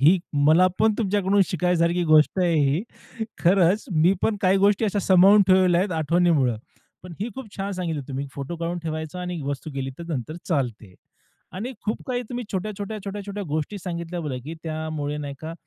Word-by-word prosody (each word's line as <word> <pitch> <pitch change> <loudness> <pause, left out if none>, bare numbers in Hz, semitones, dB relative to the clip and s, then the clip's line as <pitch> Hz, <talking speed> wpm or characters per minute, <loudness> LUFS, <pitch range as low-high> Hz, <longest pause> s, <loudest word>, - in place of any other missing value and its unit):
ही 165 +7 +6 0.3
मला 170 +4 +6
पण 220 -1 +3
तुमच्याकडून 200 -2 +2
शिकण्यासारखी 180 -1 +1
गोष्ट 155 +2 +4
आहे 175 -2 +2 0.2
ही. 160 +8 0 0.6
खरंच 185 +3 +3
मी 165 +3 +4
पण 220 - +1
काही 190 0 +4
गोष्टी 200 +2 +3
अशा 205 -1 0
सांभाळून 195 +2 +6
ठेवलेल्या 185 -2 +5
आहेत 190 0 -1
आठवणीमुळं. 155 -6 +2 0.5
पण 180 0 -10
ही 215 - -1
खूप 235 -6 -9
छान 200 +1 -3
सांगितली 170 -6 -3
तुम्ही 140 +1 -4
फोटो 140 +5 -5
काढून 170 +1 -3
ठेवायचा 160 +2 -4
आणि 180 -2 -4
वस्तू 140 +3 -4
गेली 135 -1 -3
तर 170 - -7
नंतर 145 +2 -4
चालते 120 - -2 0.6
आणि 225 +8 -5
खूप 215 - -2
काही 250 -1 -1
तुम्ही 245 0 -4
छोट्या-छोट्या, 205 +2 -4
छोट्या-छोट्या 205 0 -5
गोष्टी 155 +7 -2
सांगितल्या 170 -1 -5
बघा, 145 -6 -4
की 160 +3 -6
त्यामुळे 155 -2 -3
नाही 145 -1 -5
का 160 +1 -6
175 Hz, 175 wpm, -24 LUFS, 155-195 Hz, 0.6 s, ही